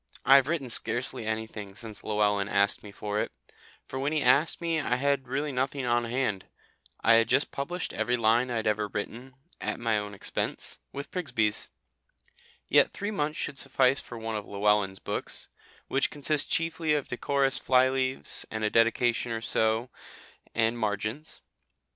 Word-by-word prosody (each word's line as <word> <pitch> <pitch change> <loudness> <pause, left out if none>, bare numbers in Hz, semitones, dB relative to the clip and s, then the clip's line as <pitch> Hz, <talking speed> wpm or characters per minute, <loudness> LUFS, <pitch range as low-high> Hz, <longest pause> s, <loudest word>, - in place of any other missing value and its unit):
I 135 - +9
have 135 -1 +3
written 155 -5 -1
scarcely 120 -1 0
anything 110 -3 -4
since 110 -1 -8
Llewellyn 105 -1 +1
asked 100 0 +2
me 105 - -10
for 105 +1 -3
it, - - -3 0.6
for 130 - -5
when 140 +2 0
he 155 -2 +1
asked 140 +6 +4
me 165 -2 0
I 125 -4 0
had 140 0 0
really 140 +3 -1
nothing 135 +1 -1
on 120 0 +2
hand. 115 -5 -1 0.5
I 115 - +5
had 115 - +3
just 145 - +2
published 175 +6 -4
every 125 0 0
line 115 +2 +3
I 120 - -2
had 110 - -1
ever 105 -1 +1
written, 120 +6 -6 0.2
at - - -3
my 115 -2 +1
own 105 0 -6
expense, - - -3
with 140 0 -7
Prigsbys. 125 - -1 1.0
Yet - - +5
three 205 +1 -4
months 150 -6 -1
should 140 - -3
suffice 135 0 +3
for 120 - -8
one 110 0 -4
of 105 -1 -4
Llewellyn's 100 -1 +1
books, - - -4 0.4
which 135 - +1
consist 145 0 +1
chiefly 165 -1 +1
of 145 - -2
decorous 135 +2 0
fly 130 0 +4
leaves 130 0 -1
and 110 0 -4
a 105 - +1
dedication 115 +1 +2
or 115 0 -2
so, 110 +2 +1 0.6
and 115 +1 +2
margins. 110 +7 -3
120 Hz, 170 wpm, -28 LUFS, 110-140 Hz, 1.0 s, I